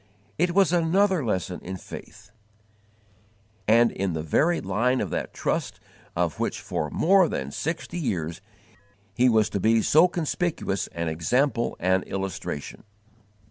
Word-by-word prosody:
It 175 +1 +1
was 195 -4 +4
another 175 +1 +2
lesson 95 -5 -2
in 95 +1 -6
faith, 105 +3 -11 1.4
and 115 +2 +5
in 95 -2 -2
the 80 -1 -3
very 165 - +2
line 120 +7 +1
of - - -3
that - - -3
trust - - -2 0.4
of - - -1
which - - -1
for 75 - -3
more 185 - +4
than 70 +1 -3
sixty 165 - -4
years 85 - -3 0.7
he 125 +4 +4
was 110 -2 +3
to 100 - -1
be 110 +3 +3
so 160 +4 +6
conspicuous 170 - -2
an 85 0 -4
example 120 - 0
and 95 +1 +2
illustration. 95 -6 -5
115 Hz, 140 wpm, -25 LUFS, -, 1.4 s, so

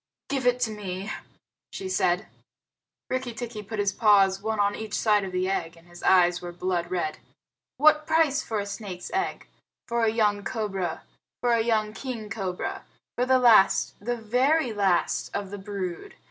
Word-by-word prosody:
Give 270 -3 0
it 245 0 +3
to 220 - +1
me," 200 -1 -5 0.6
she 190 - -5
said. 185 +1 +1 0.8
Rikki 255 -2 -3
tikki 230 -2 -5
put 215 +2 -7
his 205 -1 +1
paws 195 -3 +4
one 220 0 -2
on 205 0 +2
each 220 -1 -5
side 210 -2 +3
of 190 - -5
the 185 0 0
egg, 170 -3 -2
and 165 +1 -20
his 175 0 -13
eyes 175 -1 +4
were 175 0 -6
blood 175 -1 -2
red. 175 -4 -2 0.6
"What 305 +1 +5
price 315 -3 +3
for 225 - -3
a 200 - -2
snake's 200 -3 -7
egg? 385 +1 -2 0.4
For 235 -1 0
a 225 - +4
young 210 -2 +1
cobra? 195 -8 -3 0.4
For 245 -1 +2
a 230 - +3
young 215 -2 +1
king 225 -4 -6
cobra? 190 -5 -4 0.3
For 250 +1 0
the 260 0 +5
last 230 -6 +5
the 240 +2 -1
very 250 +4 +1
last 195 -4 +1
of 200 -1 -3
the 205 - -6
brood? 195 - -5
210 Hz, 175 wpm, -26 LUFS, 190-235 Hz, 0.8 s, What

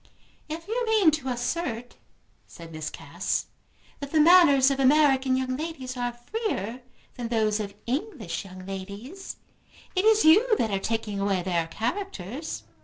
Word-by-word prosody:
"If 330 +3 -6
you 475 +3 -1
mean 425 -7 +5
to 295 -3 -3
assert," 245 -1 -3 0.5
said 165 -1 -12
Miss 155 -1 -5
Cass, - - -3 0.5
"that 280 -1 -7
the 315 - +3
manners 300 -5 +7
of 275 - -1
American 270 -1 +4
young 255 0 -1
ladies 275 -4 -5
are 245 -1 -2
freer 240 - -4 0.4
than 240 -2 -3
those 220 -2 +1
of 200 -1 -5
English 240 - -3
young 185 -1 -11
ladies, 200 - -7 0.6
it 370 - +2
is 440 -2 +5
you 430 +8 +6
that 220 - 0
are 195 - 0
taking 215 -1 -2
away 195 -2 0
their 170 -2 0
characters." 255 - -4
255 Hz, 150 wpm, -26 LUFS, 210-325 Hz, 0.6 s, manners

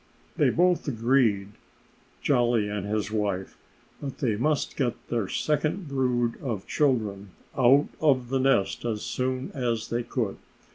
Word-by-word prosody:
They - - +3
both 180 -1 +2
agreed 115 -5 +2 0.7
Jolly 120 -5 +2
and 105 -1 -3
his 105 0 -1
wife 100 -3 -2 0.5
that 140 -2 -5
they 120 -8 0
must 145 +7 0
get 125 -4 0
their 115 -5 0
second 155 - -1
brood 125 -4 0
of 115 -8 -3
children 105 -9 0 0.2
out 135 +3 +5
of 130 -6 +2
the 135 0 +1
nest 130 -7 +2
as 110 -3 -2
soon 130 0 -2
as 120 -5 -2
they 120 +1 0
could. 115 -4 -2
120 Hz, 140 wpm, -27 LUFS, 105-135 Hz, 0.7 s, out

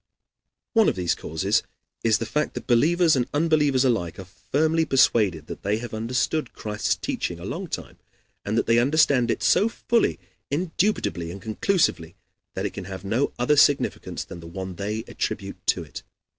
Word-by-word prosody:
One 225 -3 +5
of - - -2
these 90 -2 0
causes 95 +6 0 0.4
is 110 -3 +4
the 115 - -3
fact 150 +7 -1
that - - -5
believers 160 +7 +4
and 125 -2 0
unbelievers 150 -4 +3
alike 90 -10 0
are 95 - -8
firmly 155 - 0
persuaded 110 - +3
that - - -8
they 100 +2 0
have 120 0 -7
understood 125 +6 -1
Christ's 105 -1 -1
teaching 85 -1 -3
a 85 - -8
long 170 - -4
time, - - -6 0.4
and 105 +3 -1
that - - +2
they 115 +1 +4
understand 135 -2 +3
it - - -1
so 215 - +4
fully, 230 0 +1 0.3
indubitably, 165 - -1
and 95 +3 -7
conclusively 110 - 0 0.4
that - - -2
it - - -3
can - - -7
have 95 0 -8
no 115 +8 0
other 125 +5 +2
significance 145 -1 +2
than 85 - -10
the 85 - -10
one 95 +2 -6
they 105 +2 -3
attribute - - -4
to - - +2
it. - - -9
120 Hz, 175 wpm, -24 LUFS, 95-150 Hz, 0.4 s, One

